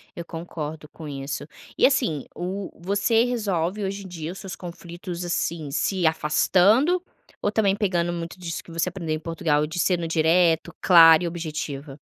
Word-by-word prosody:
Eu 170 - -5
concordo 160 -2 -6
com 160 -2 -10
isso. 140 +1 -5 0.3
E, - - +5
assim, 235 - +1
o 190 +2 -4
você 205 +5 +2
resolve 205 -5 -1
hoje 195 +1 -3
em - - -7
dia 165 -2 -6
os 190 - -9
seus 190 -1 -7
conflitos, 175 0 -7
assim, 170 -3 -2
se 185 +4 0
afastando 200 - +3 0.4
ou 205 - 0
também, 200 -3 +2
pegando 180 -5 0
muito 170 +1 -6
disso 165 -3 -5
que 170 - -14
você 165 +2 0
aprendeu 170 -4 -4
em - - -5
Portugal, 155 -2 0
de 160 - -7
sendo 175 -1 +1
direto, 165 0 +2
clara 165 -2 +8
e - - 0
objetiva? 155 -4 -5
170 Hz, 170 wpm, -24 LUFS, 160-190 Hz, 0.4 s, clara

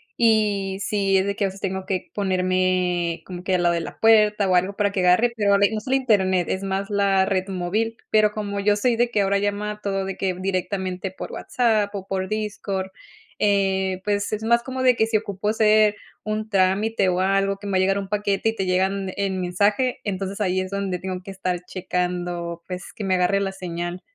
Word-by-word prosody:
y 210 -4 +2
sí 195 -1 +1
es 190 - +2
de 200 0 -1
que 205 - 0
a - - +2
veces 195 +1 -8
tengo 190 -1 -3
que 185 -2 -3
ponerme 185 -3 0
como 180 -1 -8
que 185 0 +1
al 175 - +1
lado 170 0 +3
de 170 - -1
la - - -8
puerta 210 -2 +4
o 185 - +3
algo 185 +3 +2
para 205 -1 +1
que 195 - -2
agarre, 185 +7 +4
pero 200 -2 +3
haber, 200 +2 +3
no 215 - -1
solo 260 +4 -1
Internet, 190 -8 +2
es 190 - -2
más 195 +2 -2
la 195 -1 +3
red 190 0 -1
móvil, 205 +5 -2
pero 215 -1 +4
como 205 -1 -4
yo 205 +1 +3
soy 235 +3 +1
de 240 +1 +2
que 210 -4 +1
ahora 200 0 +2
llama 205 +1 -2
todo 195 -1 -1
de 195 - -5
que 185 -2 -1
directamente 185 0 -2
por 190 - -8
WhatsApp 215 -4 0
o 190 -1 -5
por 190 -1 -2
Discord, 200 -3 -3 0.5
eh, 190 -2 +1
pues 205 0 0
es 215 +1 -3
más 235 +1 +3
como 260 0 -4
de 250 -2 +5
que 220 - +2
si 225 -1 +2
ocupo 205 0 -3
hacer 215 -1 +4 0.3
un 215 0 -3
trámite 195 +1 +2
o 180 0 0
algo 195 +1 +1
que 205 0 -9
me - - -3
va 190 - +2
a - - +2
llegar 195 +1 +2
un 195 - -5
paquete 205 +1 0
y 225 - -3
te 195 - -2
llegan 190 +1 0
en 190 -2 -1
mensaje, 205 +8 +1
entonces 195 0 -3
ahí 185 -2 +1
es 185 +1 -6
donde 195 -3 -2
tengo 185 -1 -5
que 195 - -9
estar 185 -2 -2
checando, 175 -2 -3
pues, 180 -1 -7
que 210 - -6
me 190 -1 +1
agarre 185 +2 +2
la 195 -1 -1
señal. 175 -1 -5
195 Hz, 220 wpm, -23 LUFS, 185-210 Hz, 0.5 s, de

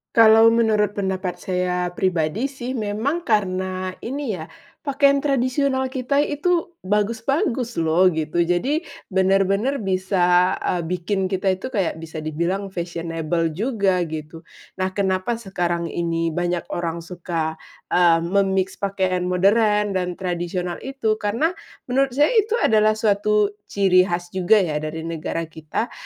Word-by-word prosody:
Kalau 225 0 +7
menurut 220 -3 +2
pendapat 190 -2 -2
saya 180 -1 -1
pribadi 180 - 0
sih, 260 -2 -6
memang 245 +8 -2
karena 185 -3 0
ini 250 - -4
ya, 160 - -6 0.4
pakaian 280 0 +3
tradisional 265 -1 0
kita 270 +2 +1
itu 340 +4 0
bagus-bagus 230 - -1
loh, 165 +3 +3
gitu. 160 -1 -1
Jadi 175 - +1 0.3
bener-bener 195 +7 +2
bisa, 185 -1 +2
eee, 180 - 0
bikin 185 +2 -1
kita 190 0 0
itu 185 +6 -3
kayak 195 -10 -1
bisa 160 -1 -7
dibilang 170 +6 -2
fashionable 165 -2 -2
juga, 200 - 0
gitu. 160 +1 -8 0.3
Nah, 185 0 -1
kenapa 190 +3 0
sekarang 175 -6 -2
ini 165 -1 -1
banyak 175 +1 -1
orang 170 -1 -3
suka, 165 -2 -4 0.3
eee, 170 -2 +5
me-mix 190 +1 0
pakaian 185 -2 -1
modern 210 +3 +3
dan 180 -2 -2
tradisional 175 -1 -3
itu, 240 -5 -2
karena 230 +11 0 0.4
menurut 265 0 +1
saya 290 +2 +4
itu 440 -1 +2
adalah 215 - +3
suatu 210 -1 +2 0.2
ciri 185 -2 +3
khas 175 -1 -3
juga 185 +3 +3
ya 155 -4 -1
dari 155 +1 -5
negara 165 0 -3
kita, 160 +7 -4
190 Hz, 130 wpm, -22 LUFS, 175-225 Hz, 0.4 s, Kalau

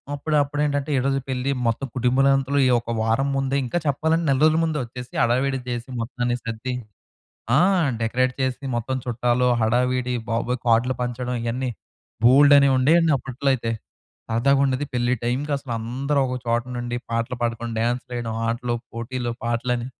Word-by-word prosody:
అప్పుడు 150 +2 -2
అప్పుడేంటంటే, 145 0 -1
7 130 - 0
రోజుల 135 -1 0
పెళ్లి, 130 +1 -1 0.2
మొత్తం 125 +4 -1
కుటుంబాలనంతలు 135 +2 +2
ఈ - - +3
ఒక 115 0 -6
వారం 115 +5 +1
ముందే 135 0 0
ఇంకా 150 +8 -2
చెప్పాలంటే, 160 +4 +1
నెల 135 - +3
రోజుల 155 +1 +4
ముందే 160 -2 0
వొచ్చేసి 125 +1 -9
హడావిడి 130 +3 +1
జేసి 120 +1 -4
మొత్తాన్ని 120 +1 -2
సర్ది 115 +2 -4 0.8
ఆ! - - +6 0.4
డెకరేట్ 125 +3 +1
చేసి, 130 +1 -1
మొత్తం 130 +3 -2
చుట్టాలు, 125 +1 +1
హడావిడి, 125 +2 +1
బాబోయ్! 120 +2 -1
కార్డులు 120 +3 +3
పంచడం 125 0 -3
ఇయన్నీ 125 +2 -2 0.5
బోల్డన్నీ 140 +2 +7
ఉండేయండి 160 +4 +4
అప్పట్లో 135 +2 -3
అయితే. 115 -2 -3 0.6
సరదాగుండేది. 135 +3 +2
పెళ్లి 120 0 +1
టైంకి 130 +5 -1
అసలు 135 -3 -6
అందరూ 135 +6 -2
ఒక 125 - -3
చోట 115 0 +1
నుండి 120 0 -3
పాటలు 115 +2 -1
పాడుకొని, 115 0 -2
డాన్సులేయడం, 120 0 -2 0.2
ఆటలు, 120 +1 -1 0.2
పోటీలు, 120 +1 -4
పాటలని, 120 +1 -1
125 Hz, 145 wpm, -23 LUFS, 120-135 Hz, 0.8 s, బోల్డన్నీ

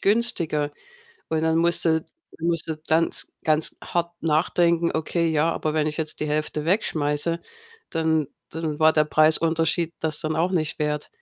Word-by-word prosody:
günstiger 170 -9 +2 0.6
und 160 -1 0
dann 160 0 +2
musst 170 +1 +2
du 160 -1 +2 0.4
musst 165 0 0
du 160 -1 -3
ganz, 165 +1 +1 0.2
ganz 155 0 +1
hart 170 0 -1
nachdenken: 170 +1 +2
„Okay, 165 +1 0
ja, 160 +1 +2
aber 155 -2 -2
wenn 155 -1 +2
ich 150 0 -2
jetzt 155 -1 -3
die - - 0
1/2 150 0 -2
wegschmeiße, 165 -3 0 0.5
dann 160 -3 +1 0.2
dann 160 -2 -4
war 155 0 +6
der 155 - +4
Preisunterschied 160 +2 +2
das 155 -1 -1
dann 155 -1 -2
auch 175 +4 +1
nicht 160 -3 -1
wert.“ 150 0 -1
160 Hz, 160 wpm, -24 LUFS, 155-170 Hz, 0.6 s, war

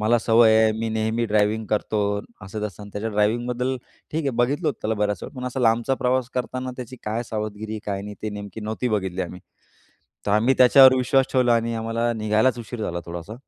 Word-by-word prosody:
मला 115 +3 +3
सवय 115 0 +5
आहे, 110 - +4
मी 115 - -2
नेहमी 110 +1 0
ड्रायव्हिंग 105 +1 +1
करतो." 105 0 0 0.4
असं-तसं 105 0 -6
आणि 100 - -10
त्याच्या 110 +2 -3
ड्रायव्हिंगबद्दल 120 +5 0 0.3
ठीक 160 +2 -1
आहे, 140 - 0
बघितलं 135 +7 0
होतं 140 - -3
त्याला 110 +1 0
बऱ्याच 105 -3 -1
वेळा. - - -8
पण 125 - -4
असा 125 +1 -3
लांबचा 120 +2 +2
प्रवास 125 0 +1
करताना 130 0 -3
त्याची 130 0 -8
काय 110 +2 -2
सावधगिरी, 110 0 -4
काय 100 -1 -2
नाही? 105 0 -7
ते 110 - -2
नेमकी 105 +1 -7
नव्हती 110 +4 -2
बघितली 95 -4 -1
आम्ही, 90 0 -7 0.9
तर - - +1
आम्ही 115 +5 +3
त्याच्यावर 130 +1 +8
विश्वास 130 +1 +3
ठेवला. 125 -2 +4
आणि 115 0 0
आम्हाला 115 +1 -1
निघायलाच 110 +3 +1
उशीर 115 0 -6
झाला 85 -4 -3
थोडासा, 85 +5 -7
110 Hz, 195 wpm, -23 LUFS, 105-125 Hz, 0.9 s, त्याच्यावर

